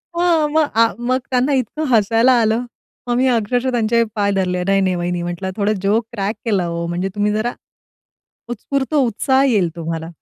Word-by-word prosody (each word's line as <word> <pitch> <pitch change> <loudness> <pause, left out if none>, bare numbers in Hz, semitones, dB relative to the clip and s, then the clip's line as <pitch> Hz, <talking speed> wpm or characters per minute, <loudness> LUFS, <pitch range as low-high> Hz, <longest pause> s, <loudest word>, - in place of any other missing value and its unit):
हो, 340 -3 +2
मग 310 0 +2
आ 230 0 +5 0.2
मग 255 - +2
त्यांना 255 +2 +1
इतकं 265 +4 -1
हसायला 225 +3 +4
आलं. 220 +1 +1 0.5
मग 240 - 0
मी 260 +1 +2
अक्षरशः 245 +2 0
त्यांचे 235 -1 +2
पाय 200 -1 +1
धरले 180 -2 -1
"नाही, 195 +1 +2
नाही 185 -1 +1
वहिनी 175 0 -2
म्हंटलं 175 +2 -4
थोडं 210 0 +1
जोक 220 +3 +2
क्रॅक 205 -1 -2
केला 200 -6 +1
हो! 170 0 -3
म्हणजे 175 +3 -2
तुम्ही 205 0 +1
जरा, 215 +3 -1 1.0
उत्स्फूर्त 265 +5 -3
उत्साह 265 0 +2
येईल 210 -10 +2
तुम्हाला." 165 -1 -4
220 Hz, 175 wpm, -19 LUFS, 190-255 Hz, 1.0 s, आ